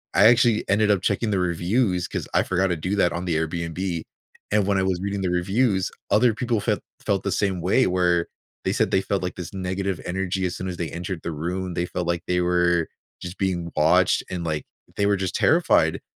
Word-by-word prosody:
I 100 - +6
actually 115 -1 +4
ended 105 +2 +3
up 100 -3 +2
checking 105 +2 0
the 100 - +1
reviews 90 +2 0
'cause - - -4
I - - +4
forgot 95 +1 +1
to 90 - 0
do 90 +6 -2
that 90 -3 +3
on 85 +1 -4
the 85 -3 0
Airbnb. 85 +2 -2 0.5
And 105 -1 +3
when 100 -1 +2
I - - +1
was 95 -2 0
reading 100 0 -2
the 95 - 0
reviews, 95 +2 +1 0.2
other 110 +3 +4
people 120 -2 0
felt - - 0 0.2
felt - - +1
the - - -1
same 95 -3 0
way 95 +9 +3
where 90 -2 +2 0.4
they - - +1
said - - +1
they 95 - +3
felt, 100 0 -1
like, 90 - -3
this 90 0 -7
negative 95 0 -3
energy 95 +1 -2
as 90 - -5
soon 95 - -4
as 90 - -5
they 85 -1 -3
entered 90 0 -5
the 85 - -3
room. 90 +3 -4
They 85 - 0
felt 90 -1 -3
like 85 -1 -1
they 90 0 +1
were 90 -1 +2 0.3
just 90 +2 -7
being 90 -3 -2
watched 90 +4 +3
and, 90 -2 -4
like, 80 -3 -2 0.3
they 100 - +2
were 100 0 +2
just 95 -1 -3
terrified. - - +3
90 Hz, 225 wpm, -24 LUFS, 85-100 Hz, 0.5 s, I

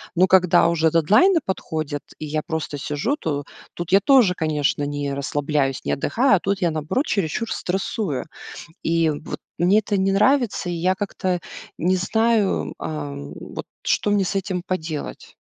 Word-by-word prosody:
Но 185 +2 +5
когда 180 -3 +5
уже 165 -1 +2
дедлайны 215 - +4
подходят, 155 -6 -3 0.2
и 155 - -5
я 155 +1 -2
просто 160 -2 -3
сижу, 150 - -1
то 145 - -3 0.3
тут 175 -1 -6
я 195 - +7
тоже, 245 -6 +5
конечно, 150 -3 0
не 145 -1 -2
расслабляюсь, 140 0 -1
не - - 0
отдыхаю, 235 - +2
а 185 - +1
тут 200 0 -1
я, 170 -2 +2
наоборот, 155 - -1
чересчур 200 +4 -1
стрессую. 180 - -2 0.6
И 165 -1 +2
вот 150 +2 -6 0.2
мне 185 +5 +4
это 205 -1 -1
не 195 0 +2
нравится, 230 -2 +2
и - - -2
я 180 +3 +1
как-то 185 -2 -2 0.4
не 185 +3 +2
знаю, 200 - +1
ам, 70 -1 -5
вот, - - -7 0.2
что 210 - +1
мне 200 -2 +2
с 185 - -2
этим 185 -2 -2
поделать. 160 -4 -5
175 Hz, 165 wpm, -22 LUFS, 150-195 Hz, 0.6 s, я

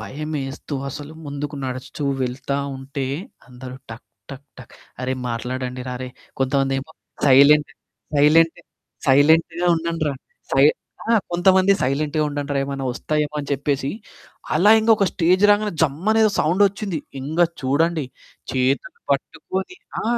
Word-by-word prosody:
భయమేస్తూ 145 +2 -5
అసలు 145 +3 -8
ముందుకు 145 +1 -5
నడుస్తూ 130 +3 -6 0.2
వెళ్తా 135 +2 -2 0.2
ఉంటే, 135 +1 -5 0.4
అందరూ 125 0 -10 0.2
టక్, 115 +1 -10 0.2
టక్, 140 +1 -10
టక్ 125 - -13 0.3
అరే, 130 +1 -1 0.2
మాట్లాడండి 125 +2 -4
రా 125 - -4
అరేయ్! 130 0 -7 0.3
కొంతమందేమో 135 +1 0 0.4
సైలెంటు 140 +2 +6 0.4
సైలెంటు 160 +4 +4 0.5
సైలెంట్‌గా 160 +5 +4
ఉండండ్రా. 165 -2 -2 0.4
సై 135 +1 +4 0.5
ఆ! - - +5 0.2
కొంతమంది 185 +2 +4
సైలెంట్‌గా 150 +4 0
ఉండండ్రా. 145 -1 -3
ఏమన్న 135 -1 -4
వస్తాయేమో! 150 +3 -2
అని 145 - -8
చెప్పేసి 140 0 -1 0.6
అలా 180 +7 +5
ఇంక 220 +1 +1
ఒక 200 - +2
స్టేజ్ 180 +3 +2
రాగానే 205 0 +2
జమ్ 150 -1 +1
అనే 220 0 +3
ఏదో 215 - +4
సౌండొచ్చింది. 195 +2 +1 0.2
ఇంగ 150 +5 -5 0.2
చూడండి 155 +4 +1 0.5
చేతులు 130 +1 0
పట్టుకొని 190 - -4 0.3
ఆ! - - -5
145 Hz, 125 wpm, -21 LUFS, 135-165 Hz, 0.6 s, సైలెంటు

